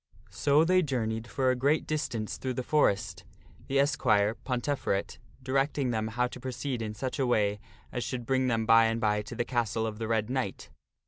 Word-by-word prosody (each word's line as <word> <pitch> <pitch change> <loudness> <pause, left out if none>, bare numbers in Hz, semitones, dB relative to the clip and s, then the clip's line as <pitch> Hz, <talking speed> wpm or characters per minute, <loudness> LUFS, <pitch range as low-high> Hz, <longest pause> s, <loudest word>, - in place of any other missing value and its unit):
So 145 +2 +3
they 185 +2 +4
journeyed 115 -6 -2
for 130 0 +1
a - - +1
great 140 +5 +1
distance 120 -8 -3
through 130 -1 -3
the 130 - -2
forest, 120 -9 +1 0.4
the 135 - 0
esquire, 105 -7 +3
Ponteferet, 125 -5 -2 0.2
directing 135 0 0
them 110 -1 -1
how 120 +3 0
to 125 - -9
proceed 125 0 -4
in 105 -1 -4
such 130 +6 -4
a 130 - +2
way 105 -3 +1 0.3
as 125 - -3
should 120 -2 -4
bring 130 +1 +1
them 115 -2 +1
by 115 0 +6
and 115 0 0
by 105 -2 +1
to 105 +3 -8
the 120 - -1
castle 115 -3 -1
of 110 -1 -5
the 110 - -3
Red 110 -2 +1
Knight. 125 -6 -3
120 Hz, 195 wpm, -29 LUFS, 110-135 Hz, 0.4 s, by